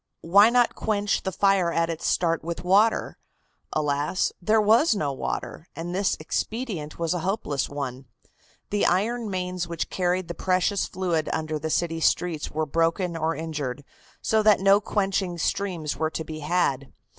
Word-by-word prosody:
Why 200 +6 +6
not 245 0 +3
quench 205 -2 0
the 190 - -3
fire 195 -2 +2
at 165 0 +1
its 165 - -4
start 165 -2 +1
with 170 +1 -5
water? 205 +5 +2 0.5
Alas! 150 +3 0
there 215 +5 +3
was 220 +6 +4
no 145 -8 -1
water, 155 +4 -5
and 170 +2 -5
this 195 +1 +1
expedient 185 -1 -3
was 165 0 0
a 180 - -2
hopeless 160 -6 -2
one. 135 -2 -5 0.6
The 205 - +2
iron 220 +5 0
mains 180 -2 -3
which 170 -1 -4
carried 180 -1 0
the 170 - -4
precious 185 +3 0
fluid 175 -4 -1
under 155 -1 -2
the 160 - -3
city 165 0 0
streets 165 -1 0
were 155 +1 -2
broken 165 +3 0
or 165 0 -1
injured 145 -4 -4 0.4
so 220 0 +2
that 215 -1 +5
no 195 +2 +5
quenching 195 -4 -1
streams 170 -3 -2
were 160 - -1
to 160 - -4
be 155 0 -7
had. 145 -5 0
175 Hz, 165 wpm, -25 LUFS, 160-195 Hz, 0.6 s, Why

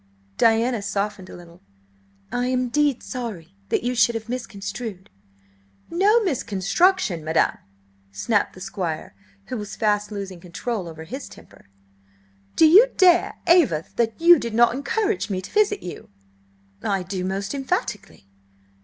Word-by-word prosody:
Diana 230 0 +3
softened 200 -2 -3
a - - -10
little. 175 -1 -14 0.7
"I 245 0 -1
am 255 0 +1
indeed 280 +1 +1
sorry 210 - -6 0.2
that - - 0
you 245 +1 0
should 235 -1 +3
have 225 0 -5
misconstrued—" 205 - -6 0.8
"No 410 +7 +3
misconstruction, 235 - +1
madam!" 160 +1 +1 0.5
snapped 205 - 0
the 185 - -12
Squire, 175 - -4 0.3
who 250 - -5
was 210 -2 -6
fast 210 -1 0
losing 195 -3 -6
control 185 +3 -4
over 160 -1 -9
his 260 - -7
temper. - - -17 0.9
"Do - - +6
you 390 +10 +8
dare 360 -2 +4
aver 300 - +4
that 230 -1 0
you 340 -1 +7
did 235 -3 -4
not 235 0 +5
encourage 390 - -1
me 190 -2 -1
to 185 - -9
visit 415 -1 +2
you?" 175 - -8 0.7
"I 195 -2 -1
do, 185 0 -4
most 195 +4 -3
emphatically!" 260 - -3
225 Hz, 140 wpm, -23 LUFS, 190-275 Hz, 0.9 s, you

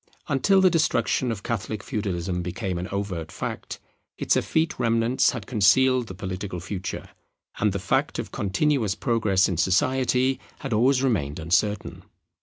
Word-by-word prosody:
Until 180 +7 +3
the 185 -1 +5
destruction 130 -6 +1
of 105 -3 -5
Catholic 110 -2 -3
Feudalism 90 -4 -2
became 90 +1 -3
an 90 - -4
overt 95 -5 -4
fact, - - -5 0.4
its - - +1
effete 160 -3 0
remnants 115 +1 +2
had 120 -6 -4
concealed 125 +4 +3
the 95 - -8
political 95 -1 -5
future, 95 +1 -5 0.5
and - - +2
the - - -2
fact - - 0
of - - -5
continuous 110 +1 0
progress 105 -4 +2
in 90 - -2
society 130 +8 +2 0.2
had 135 -5 -3
always 130 +4 +3
remained 80 - 0
uncertain. 100 +5 0
105 Hz, 145 wpm, -25 LUFS, 95-130 Hz, 0.5 s, the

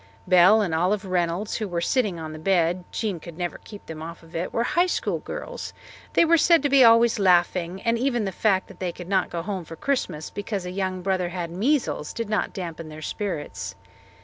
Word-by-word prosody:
Belle 185 +4 +6
and 175 -5 -2
Olive 185 +5 +1
Reynolds, 180 +2 -1
who 215 - -3
were 175 -2 -2
sitting 200 -1 0
on 155 -1 -6
the 155 - -8
bed 175 0 +1
Jean 205 -6 -2
could 170 0 -11
never 175 -1 -3
keep 205 -2 -12
them 160 -1 -8
off 165 +1 -8
it 165 +2 -4
were 235 - 0
High 350 +8 +2
School - - -1
girls; - - -7 0.4
they - - +5
were 335 0 +5
said 335 -1 +5
to 290 - +2
be 275 -1 +6
always 230 -1 +6
laughing, 180 -1 +2
and 230 0 +1
even 240 -4 0
the 195 - -2
fact 190 -1 +1
that - - -14
they 180 -2 -2
could 175 0 -10
not 190 -1 +1
go 170 -1 -4
home 190 -1 -3
for 165 0 -9
Christmas 170 - -2
because 205 -2 -4
a 180 - -4
young 185 -1 -3
brother 185 -2 0
had 175 -2 -4
measles 225 - 0
did 230 -2 -4
not 210 - 0
dampen 165 -3 -6
their 155 0 -9
spirits. 145 - -4
185 Hz, 215 wpm, -25 LUFS, 170-215 Hz, 0.4 s, Belle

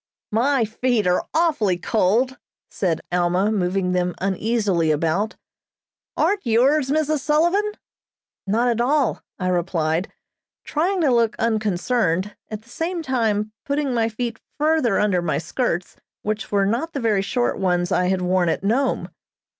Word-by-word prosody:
"My 245 +3 +2
feet 225 0 0
are 180 0 +1
awfully 300 - +2
cold," 225 +8 +1 0.3
said 175 -5 -1
Alma, 180 +3 +2
moving 185 -2 0
them 180 -1 0
uneasily 195 -3 0
about. 165 +8 0 0.8
"Aren't 405 -1 +1
yours, 260 +5 +3
Mrs. 310 +1 +1
Sullivan?" 345 +9 +2 0.7
"Not 230 +5 +2
at 235 -1 +1
all," 275 0 +1 0.2
I 185 - -2
replied, 170 -1 0 0.5
trying 355 +5 0
to 280 -6 +3
look 230 -2 +2
unconcerned, 210 -3 0
at 215 0 -6
the 230 - -22
same 330 +6 -3
time 220 -6 0
putting 280 -2 -1
my 230 -1 +1
feet 230 0 -4 0.2
further 300 -8 +2
under 195 -4 +2
my 170 -2 -1
skirts, 180 -2 -2 0.3
which 215 0 -3
were 200 -1 +2
not 240 +11 -1
the 280 - -2
very 220 -5 +2
short 240 +5 -1
ones 175 -2 +1
I 180 - +2
had 185 0 0
worn 180 -1 +2
at 165 - -1
Nome. 250 +7 +1
220 Hz, 145 wpm, -22 LUFS, 185-260 Hz, 0.8 s, yours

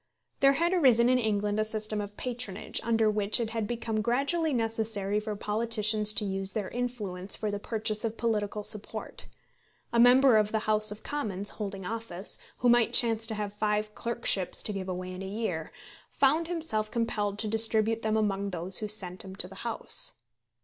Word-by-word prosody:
There 275 0 +5
had 340 +5 +1
arisen 250 -9 +5
in 255 0 +4
England 210 -2 0
a - - +3
system 215 -1 -1
of 205 0 -8
patronage, 240 -6 -3
under 225 -1 +2
which 210 +1 +2
it 225 -2 -2
had 225 -2 -2
become 225 -2 -2
gradually 280 +8 +1
necessary 220 -4 -1
for 210 0 -4
politicians 215 0 +2
to 210 - +1
use 195 0 -2
their 210 -4 -3
influence 210 -7 -3
for 215 -1 -3
the 205 - -3
purchase 215 0 -2
of 225 -1 -3
political 210 -2 -1
support. 210 0 -6 0.7
A 235 - +3
member 250 0 +7
of 210 0 +2
the 220 -1 -1
House 215 0 +3
of 210 +1 -9
Commons, 205 -9 -2
holding 195 -3 -6
office, 225 -3 -5 0.2
who 245 - +1
might 240 -1 +4
chance 225 -2 +5
to 220 - -3
have 205 -1 -4
five 210 0 -1
clerkships 230 -6 0
to 210 - -1
give 190 -1 -5
away 185 0 -4
in 185 +1 -7
a 195 - -5
year, 190 -6 -3 0.4
found 305 +4 +2
himself 315 -12 -2
compelled 215 -3 -1
to 215 - -1
distribute 225 0 +3
them 220 0 0
among 200 -2 0
those 180 +1 +2
who 215 - -3
sent 190 -3 0
him 190 0 -9
to 180 - -2
the 190 - -12
House. 235 -1 -1
215 Hz, 185 wpm, -29 LUFS, 205-230 Hz, 0.7 s, member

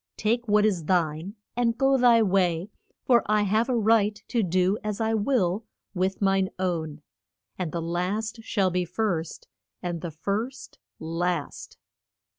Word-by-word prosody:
Take 235 +3 0
what 210 0 +4
is 185 -7 0
thine, 170 +2 0 0.2
and 235 -1 +1
go 270 0 +3
thy 240 -3 +5
way; 185 -1 +1 0.3
for 240 -3 +5
I 210 0 +3
have 215 +5 +1
a 250 - +2
right 215 -1 +3
to 235 - +1
do 185 +2 +1
as 210 0 -3
I 225 0 +1
will 210 -3 +1 0.3
with 190 +1 -1
mine 195 -1 +2
own. 160 -5 -3 0.6
And 175 -4 -2
the 170 -1 -3
last 190 +7 -2
shall 195 -4 0
be 180 0 0
first 175 -3 -3 0.3
and 175 -2 -4
the 170 - -4
first 205 - -4 0.2
last. 165 0 -3
195 Hz, 150 wpm, -26 LUFS, 175-220 Hz, 0.6 s, thy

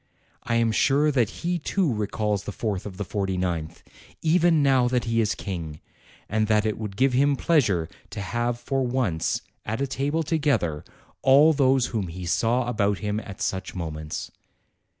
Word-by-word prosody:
I 115 - -1
am 115 -1 +3
sure 140 +6 +3
that 120 -6 +2 0.2
he 175 0 0
too 170 -2 0
recalls 105 -1 -1
the - - -4
fourth 105 -2 -3
of 95 -3 -9
the 105 - -3
forty 95 -1 -2
ninth, 85 -4 -3 0.4
even 165 -1 +4
now 130 -3 +4
that 125 0 +1
he 115 -1 +1
is 110 -1 0
King; 80 -6 -5 0.5
and 110 +1 0
that 105 0 +3
it 110 -1 -1
would 105 -3 -6
give 135 +1 +3
him 140 +2 +3
pleasure 115 - +2 0.2
to 100 - -7
have 120 +5 -1
for 135 +2 -1
once, 120 -10 -1 0.2
at 110 +2 -3
a 140 - +1
table 140 +5 -1
together, 140 - 0 0.4
all 145 +4 +6
those 135 -3 +3
whom 105 -5 -1
he 90 +2 -7
saw 115 +8 +1
about 105 -4 +1
him 105 +1 -2
at 100 -3 -7
such 95 0 -3
moments. 80 -3 -5
115 Hz, 175 wpm, -25 LUFS, 95-135 Hz, 0.5 s, all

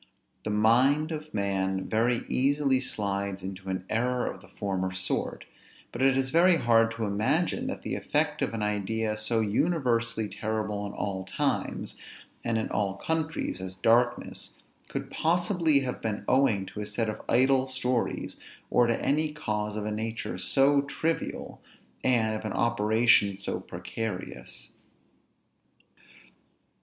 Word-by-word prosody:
The - - -1
mind 125 +9 +3
of 155 -1 -5
man 95 -1 -1
very 115 +2 +1
easily 135 0 +2
slides 100 -6 -2
into 95 0 -6
an 95 -1 -3
error 125 +2 0
of - - -5
the - - -15
former 95 -2 -2
sort; 95 0 -2 0.5
but - - -5
it 135 0 +4
is 135 0 0
very 175 +2 +6
hard 115 -3 +4
to 115 -1 -2
imagine, 115 - 0
that - - -5
the - - -3
effect - - 0
of - - 0
an 110 - -2
idea 105 +1 -1
so 110 +1 0
universally 115 -2 +1
terrible 105 0 -3
in 100 - -8
all 95 -2 -3
times, 95 - -2 0.5
and 115 -1 0
in 110 - -1
all 100 -2 0
countries, 160 - -2
as 95 0 -6
darkness, 120 +5 +1 0.3
could - - -5
possibly 170 -3 +2
have 125 -2 -4
been 105 -2 -3
owing 120 -8 +3
to 100 +2 -8
a 105 - -3
set 105 +2 -1
of 110 - -4
idle 130 +2 +4
stories, 130 -2 -1 0.3
or 120 -1 +5
to 115 - +1
any 150 +2 +2
cause 105 -8 -3
of 105 -1 -3
a 105 - -2
nature 110 +1 -3
so 140 +1 +4
trivial, 160 +3 -3 0.4
and 115 -4 +2
of 110 - -5
an 110 - -3
operation 110 -2 +3
so 100 - -3
precarious. 110 -5 -6
115 Hz, 145 wpm, -28 LUFS, 105-130 Hz, 0.5 s, very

